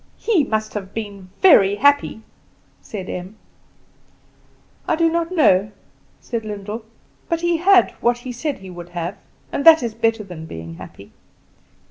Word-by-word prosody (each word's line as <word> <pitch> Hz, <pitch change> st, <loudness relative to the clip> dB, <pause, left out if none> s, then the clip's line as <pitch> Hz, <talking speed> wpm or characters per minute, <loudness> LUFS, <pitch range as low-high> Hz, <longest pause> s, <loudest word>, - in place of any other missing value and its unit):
"He 410 Hz, -9 st, +2 dB
must 215 Hz, -3 st, -2 dB
have 195 Hz, -2 st, -6 dB
been 200 Hz, -4 st, -6 dB
very 205 Hz, -, +6 dB
happy," 285 Hz, -2 st, +2 dB, 0.6 s
said 190 Hz, -4 st, -7 dB
Em. 185 Hz, +4 st, -7 dB, 1.5 s
"I -, -, +2 dB
do 330 Hz, 0 st, +2 dB
not 335 Hz, +1 st, -1 dB
know," 210 Hz, -, +3 dB, 0.5 s
said 230 Hz, -2 st, -4 dB
Lyndall; 210 Hz, +1 st, -6 dB, 0.4 s
"but 335 Hz, -1 st, 0 dB
he 345 Hz, -1 st, +1 dB
had 370 Hz, +2 st, +5 dB
what 240 Hz, 0 st, +2 dB
he 245 Hz, +1 st, -7 dB
said 280 Hz, +4 st, -3 dB
he 190 Hz, -1 st, -11 dB
would 175 Hz, -1 st, -10 dB
have, 175 Hz, +3 st, -3 dB, 0.4 s
and 280 Hz, -, -2 dB
that 320 Hz, -3 st, +8 dB
is 230 Hz, -2 st, -3 dB
better 225 Hz, -1 st, 0 dB
than 170 Hz, -5 st, -9 dB
being 80 Hz, -, -8 dB
happy. -, -, -12 dB
220 Hz, 150 wpm, -20 LUFS, 195-305 Hz, 1.5 s, that